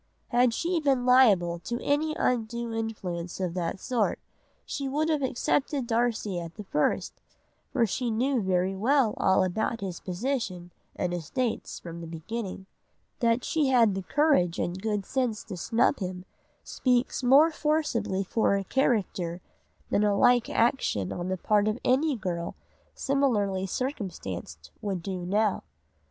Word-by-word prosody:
Had 245 0 +4
she 340 +8 0
been 270 -5 +1
liable 200 -10 +5
to 240 +7 -4
any 310 +2 +1
undue 235 -1 -1
influence 185 -7 -4
of 180 -3 -2
that 175 +1 -2
sort, 240 -3 0 0.5
she 275 -1 -3
would 305 +4 0
have 305 -2 +1
accepted 270 +1 0
Darcy 225 -5 0
at 170 -1 -8
the 210 - -7
first, 150 -6 -1 0.5
for 245 -4 +3
she 240 +4 -2
knew 245 +3 +1
very 185 0 +1
well 235 +2 +2
all 190 0 +3
about 220 +5 -1
his 185 -4 -4
position 185 -3 -3 0.2
and 180 -1 -2
estates 220 - -2
from 170 -1 -8
the 165 - -7
beginning. 190 +4 -5 0.5
That 235 -1 +2
she 310 -4 +1
had 235 -6 +4
the 195 - -3
courage 230 - +2
and 180 +2 -2
good 210 -2 -1
sense 250 -5 -1
to 200 - -7
snub 230 +10 +1
him 185 -1 -5 0.4
speaks 250 0 0
much 245 - 0
more 300 +5 +7
forcibly 300 -11 0
for 200 +1 +1
her 195 - -2
character 190 -8 0 0.5
than 205 - +3
a 205 -1 +2
like 245 +2 +4
action 225 - +1
on 175 0 -4
the 185 0 -1
part 210 +3 +2
of 215 +1 0
any 280 +3 +3
girl 175 -5 -4 0.4
similarly 210 -9 +1
circumstanced 130 - -5
would 195 -4 -3
do 180 -2 -4
now. 210 +1 +1
220 Hz, 150 wpm, -27 LUFS, 185-255 Hz, 0.5 s, more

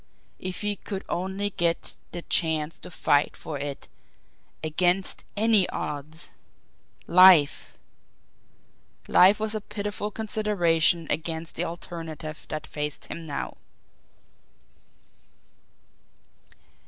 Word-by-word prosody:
If 185 0 -4
he 205 -1 -1
could 195 -1 -6
only 190 +3 -2
get 170 -2 -1 0.2
the 175 -1 -6
chance 160 -2 0
to - - -10
fight 145 -3 +1
for 150 -3 -6
it 140 0 -5 0.8
against 175 +4 0
ANY 215 -3 +4
odds! 150 0 -5 0.8
Life! 175 -4 +6 1.3
Life 190 +4 +6
was 215 0 -1
a 215 - -2
pitiful 210 0 -4
consideration 185 -7 +1
against 160 0 -2
the - - -1
alternative 165 -2 -7
that 155 0 -4
faced 150 -1 -5
him 165 -1 -6
now! 145 - -4
170 Hz, 95 wpm, -26 LUFS, 155-200 Hz, 1.3 s, Life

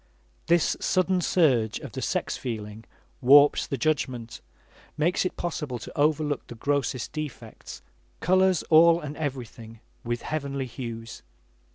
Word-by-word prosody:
This 170 -1 +3
sudden 185 0 +1
surge 130 - +2
of - - -9
the - - -6
sex - - -1
feeling 110 -2 -6 0.4
warps 140 +3 +6
the 140 - -3
judgment, 125 -5 -2 0.6
makes 175 +5 +1
it 185 - -3
possible 150 -7 -3
to 115 - -10
overlook 150 -1 0
the 120 - -9
grossest 140 0 -1
defects, 155 -4 -8 0.4
colors 185 -1 +3
all 165 +1 +7
and 150 -2 -7
everything 120 -6 -6 0.2
with 120 0 -3
heavenly 140 -3 -3
hues. 115 -3 -7
140 Hz, 130 wpm, -26 LUFS, 120-155 Hz, 0.6 s, all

